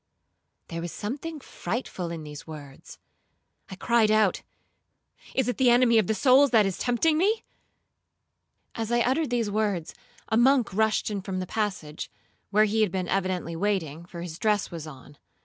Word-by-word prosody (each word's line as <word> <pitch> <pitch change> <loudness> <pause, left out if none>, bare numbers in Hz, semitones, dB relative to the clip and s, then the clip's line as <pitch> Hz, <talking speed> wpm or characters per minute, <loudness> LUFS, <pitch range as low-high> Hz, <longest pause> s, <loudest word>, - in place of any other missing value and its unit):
'—There 165 0 -4
was 170 0 -5
something 290 - -5
frightful 190 -7 -5
in 165 -2 -6
these 150 0 -9
words. 145 -3 -11 0.7
I 190 - -7
cried 230 +2 +2
out, 215 -3 +3 0.9
'Is 265 -3 +1
it 245 - -1
the 260 -2 +4
enemy 240 -1 +5
of 205 - 0
souls 275 +1 +5
that 220 -4 +5
is 195 -2 -2
tempting 305 +6 +2
me?' 430 +5 +2 1.3
As 225 0 -4
I 240 0 +3
uttered 265 +5 +1
these 235 -4 0
words, 200 -6 -1 0.3
a 220 - +1
monk 250 -3 +4
rushed 220 +1 +1
in 200 -2 -3
from 190 -1 -4
the 185 - -2
passage, 190 -8 -3 0.4
(where 215 +2 +4
he 220 +1 +1
had 210 -4 +2
been 185 -1 -2
evidently 185 -3 -1
waiting, 170 -5 -1
for 175 -1 -8
his 170 0 -7
dress 210 -3 +1
was 165 -2 -7
on). 140 0 -13
210 Hz, 165 wpm, -26 LUFS, 175-240 Hz, 1.3 s, enemy